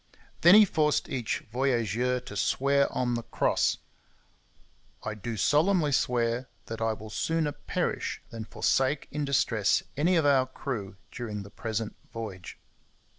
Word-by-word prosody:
Then 175 +4 +8
he 215 0 +9
forced 155 -5 +1
each 125 -4 -2
voyageur 125 -1 +1
to 105 - -9
swear 140 +7 +2
on 120 -1 0
the 120 - -1
Cross: - - +1 1.3
'I 110 - -3
do 110 +2 -5
solemnly 155 - +3
swear 120 -1 0 0.2
that 115 0 -6
I 115 0 +1
will 110 0 -10
sooner 160 +4 0
perish - - -3
than 115 -1 -6
forsake 135 +5 0
in 150 0 -2
distress 115 -6 +2
any 165 +6 +2
of 160 -3 +3
our 135 -2 +4
crew 115 -6 -5 0.2
during 105 -4 -5
the 100 - -13
present 110 0 -4 0.2
voyage.' 105 -6 -7
125 Hz, 140 wpm, -28 LUFS, 110-145 Hz, 1.3 s, he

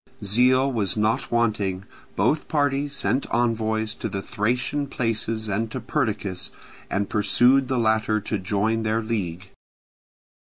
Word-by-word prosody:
Zeal 130 +6 +4
was 105 -4 +1
not 110 +1 0
wanting: 105 -5 0 0.3
both 155 - +1
parties 145 -1 0
sent 135 0 0
envoys 110 -2 0
to 115 - -5
the 100 -1 -4
Thracian 125 +6 -1
places 115 -3 -1
and 110 +3 -1
to - - -4
Perdiccas, 105 -9 -2 0.4
and 100 0 -1
persuaded 125 +5 +3
the 130 -1 0
latter 110 -1 +2
to 105 0 -3
join 105 +4 0
their 110 +1 0
league. 95 -5 -4
110 Hz, 130 wpm, -24 LUFS, 105-125 Hz, 0.4 s, Zeal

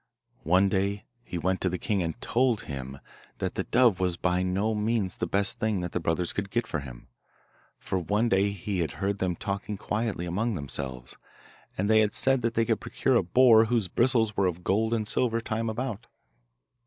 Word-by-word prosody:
One 90 +4 +4
day 100 +1 -1 0.2
he 90 - -5
went 95 +3 -1
to 95 - +2
the 90 - -2
king 100 +1 -1
and 80 -2 -3
told 120 -1 +1
him 70 -2 -7 0.4
that - - -3
the - - -3
dove 120 -7 +3
was 90 -2 0
by 90 +1 +1
no 95 +4 0
means 105 -3 -1
the - - -2
best 100 +3 0
thing 110 -5 0
that 90 -1 -4
the - - -1
brothers 85 +1 -1
could 100 -1 -3
get 120 +3 -1
for 75 - -3
him; 60 -4 -10 0.7
for 95 - -2
one 105 +7 +1
day 100 -1 +3
he 100 -1 -3
had 80 -7 -1
heard 100 0 -2
them 90 -2 0
talking 100 +3 -4
quietly 105 -3 -2
among 105 +6 -1
themselves, 65 -4 -5 0.6
and 100 - 0
they 110 0 +5
had 105 -1 +2
said 135 -1 +3
that 115 0 -1
they 115 - +2
could - - 0
procure - - 0
a - - +5
boar 115 +4 +6
whose 115 -4 +1
bristles 115 -1 +2
were 95 -1 +2
of 90 0 -4
gold 110 +5 +1
and 110 -2 -1
silver 115 0 0
time 115 0 -2
about. 120 0 -4
100 Hz, 205 wpm, -27 LUFS, 90-110 Hz, 0.7 s, boar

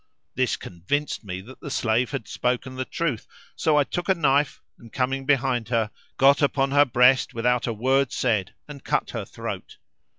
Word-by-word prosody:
This 130 -1 +1
convinced 115 - -3
me 95 -2 -5
that 125 +7 -13
the 145 - -7
slave 120 -1 +1
had 110 - -5
spoken 125 +1 -2
the 130 0 -3
truth, 150 -9 -3 0.3
so 155 -2 +2
I 145 - +5
took 175 +7 -4
a 190 - +5
knife 145 -3 +2 0.2
and 115 -1 -14
coming 135 +1 -1
behind 130 -5 +1
her 115 -3 0 0.3
got 140 +2 +5
upon 135 -1 +2
her 145 +1 +6
breast 125 0 +4
without 125 +1 +1
a 115 - -1
word 130 +4 +1
said 110 -5 0
and 145 -2 -10
cut - - -1
her - - -4
throat. - - -7
130 Hz, 185 wpm, -24 LUFS, 115-140 Hz, 0.3 s, her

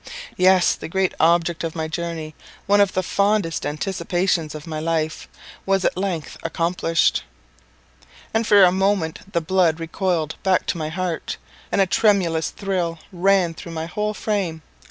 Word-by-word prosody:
Yes, 185 0 +4
the - - -7
great 190 +1 0
object 170 0 +2
of 165 0 -3
my 160 -1 -2
journey 160 -1 -4 0.3
one 205 +1 +4
of 200 -1 +2
the 185 - 0
fondest 200 -7 0
anticipations 170 0 -1
of 150 - -8
my 155 -2 -4
life 160 0 -2 0.4
was 195 -1 +1
at - - +1
length 185 -4 -3
accomplished; 165 0 +1 1.1
and 225 0 +1
for 205 -2 +7
a 180 - +6
moment 190 -1 -1
the 170 - 0
blood 170 -1 +2
recoiled 165 -1 -2
back 190 -2 +2
to - - -2
my 155 -1 -2
heart, 175 -1 -3 0.3
and - - +3
a - - +5
tremulous 180 -4 +2
thrill 180 -4 -2 0.2
ran 185 -1 +2
through 165 +1 -9
my 160 0 -3
whole 210 +5 -2
frame. 185 -8 -2
175 Hz, 155 wpm, -22 LUFS, 165-195 Hz, 1.1 s, for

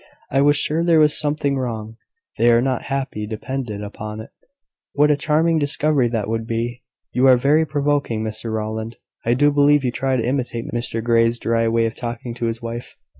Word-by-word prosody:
I 135 - +3
was 145 +1 +4
sure 160 +3 +1
there 170 -2 +4
was 150 -1 +4
something 145 -2 0
wrong. 115 -3 -5 0.4
They 120 +1 +5
are 115 - +5
not 130 0 -1
happy, 135 -6 -3
depend 125 +3 -4
upon 105 +1 -6
it." 110 - -12 0.6
"What 150 +1 +4
a - - +4
charming 160 +3 +1
discovery 145 -2 +2
that 115 -3 -2
would 115 0 -3
be!" 115 +1 -3 0.3
"You 130 +2 +3
are 130 -1 +7
very 150 +5 +2
provoking, 145 -6 0
Mr 110 +1 -4
Rowland! 110 +1 -4 0.3
I 120 +1 +2
do 145 +3 +4
believe 145 0 +4
you 125 - 0
try 130 +2 -1
to 115 - -1
imitate 125 -3 -2
Mr 120 -1 -2
Grey's 115 0 +3
dry 115 0 0
way 115 0 +2
of 115 - -2
talking 120 0 -5
to 120 0 -3
his 115 +1 -4
wife." 115 +1 -6
120 Hz, 195 wpm, -21 LUFS, 115-145 Hz, 0.6 s, are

